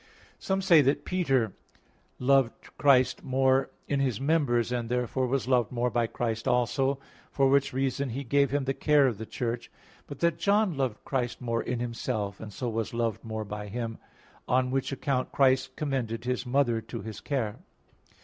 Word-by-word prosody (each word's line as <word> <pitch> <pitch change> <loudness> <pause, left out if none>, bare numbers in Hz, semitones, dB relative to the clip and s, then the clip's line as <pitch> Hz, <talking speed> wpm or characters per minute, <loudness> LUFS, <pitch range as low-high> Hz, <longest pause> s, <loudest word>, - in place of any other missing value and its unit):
Some 195 0 -1
say 170 -5 +7
that 140 +1 +1
Peter 135 - +1 0.6
loved 135 -2 +1
Christ 130 -3 +4
more 130 0 +2 0.2
in 140 - 0
His 130 -6 0
members, 135 -6 +1
and 120 -2 -2
therefore 125 +1 0
was 135 0 -1
loved 125 -4 +2
more 125 0 0
by 120 -1 +1
Christ 115 -1 -3
also, 130 +3 +1 0.3
for 135 -1 +3
which 140 +1 +3
reason 135 +1 -1
He 135 +4 -4
gave 140 +2 +2
him 145 0 0
the 135 - 0
care 150 0 +4
of 120 -6 0
the 110 - -6
Church; 120 -1 -3 0.4
but 145 - -8
that 170 -1 +2
John 205 -3 +2
loved 130 -6 -2
Christ 125 -3 -2
more 115 -2 -1
in 125 -1 -3
Himself, 110 -4 -3
and 110 -1 -8
so 125 +5 -4
was 115 0 -2
loved 115 -2 -1
more 110 -1 -4
by 105 0 -6
Him; 115 +1 -4 0.5
on 125 0 +2
which 135 +1 -1
account 135 -1 -1
Christ 130 -1 +2
commended 120 -6 -2
His 125 0 -2
mother 125 -3 +2
to 110 +1 -7
his 110 -1 -7
care. 120 -6 -2
125 Hz, 180 wpm, -28 LUFS, 115-135 Hz, 0.6 s, say